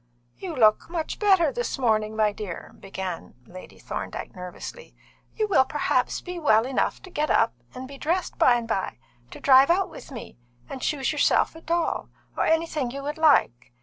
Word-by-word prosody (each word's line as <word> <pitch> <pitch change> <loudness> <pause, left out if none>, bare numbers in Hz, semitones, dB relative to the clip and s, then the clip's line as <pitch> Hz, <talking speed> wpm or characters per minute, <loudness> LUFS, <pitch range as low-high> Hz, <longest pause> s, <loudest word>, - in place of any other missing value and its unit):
"You 360 -4 -6
look 215 0 +4
much 335 -2 -4
better 380 -7 +4
this 485 -8 -3
morning, 220 -4 +1
my 215 -1 +2
dear," 200 -4 -7
began 190 -3 -6
Lady 185 +1 -12
Thorndyke - - -6
nervously. 180 - -9 0.4
"You 430 -1 0
will 375 -10 +4
perhaps 265 -2 0
be 360 -1 -6
well 225 -7 +4
enough 260 0 -1
to 375 - -12
get 300 -1 -1
up - - +3 0.2
and 255 +1 -7
be 275 0 -11
dressed 345 +4 -2
by 245 - +6
and 235 -1 -3
by, 195 -4 -2 0.3
to - - -10
drive 270 +1 +6
out 375 +3 +2
with - - -11
me, 230 - -10 0.3
and 260 - -7
choose 280 -4 0
yourself 300 +1 +2
a 325 - -11
doll, 335 +1 -1 0.3
or - - 0
anything 320 -5 0
you 275 +3 -7
would 295 +2 -4
like. 120 - +3
275 Hz, 180 wpm, -25 LUFS, 220-330 Hz, 0.4 s, by